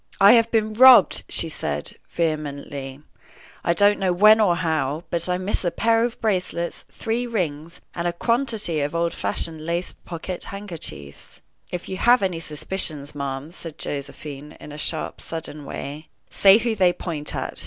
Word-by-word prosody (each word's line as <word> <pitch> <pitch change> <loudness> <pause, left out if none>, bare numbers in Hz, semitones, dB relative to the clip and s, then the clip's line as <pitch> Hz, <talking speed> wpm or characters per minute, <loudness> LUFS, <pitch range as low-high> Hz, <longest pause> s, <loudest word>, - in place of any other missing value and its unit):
"I 200 +1 +8
have 230 -1 +5
been 220 -1 +1
robbed!" 250 -3 +7
she - - +1
said, 75 - -3
vehemently, 145 -4 -3 0.6
"I 170 - +2
don't 205 +4 +4
know 190 -2 +1
when 215 +5 +6
or 185 -5 +3
how; 160 -3 -1
but 170 +1 -1
I 180 - +1
miss 185 +2 -2
a 175 - +1
pair 225 +6 +2
of 240 0 -3
bracelets, 180 -5 -2
three 235 +2 -2
rings, 170 -7 -3
and 170 0 -2
a - - +1
quantity 220 - 0
of 145 +3 -2
old 170 0 0
fashioned 160 -2 -1
lace 170 +2 -2
pocket 175 +1 -7
handkerchiefs." 170 - -8 0.3
"If 180 -1 -5
you 190 - -5
have 240 +1 +4
any 180 -3 -1
suspicions, 155 -2 -3
ma'am," 140 +1 -5
said 165 -3 -9
Josephine, 145 +1 -6
in 150 - -10
a - - -8
sharp, 160 +1 -2
sudden 155 -3 -5
way, 150 +3 -7 0.2
"say 195 +1 +7
who 230 0 0
they 185 -4 +3
point 155 -5 -5
at. - - -2
170 Hz, 165 wpm, -23 LUFS, 150-205 Hz, 0.6 s, I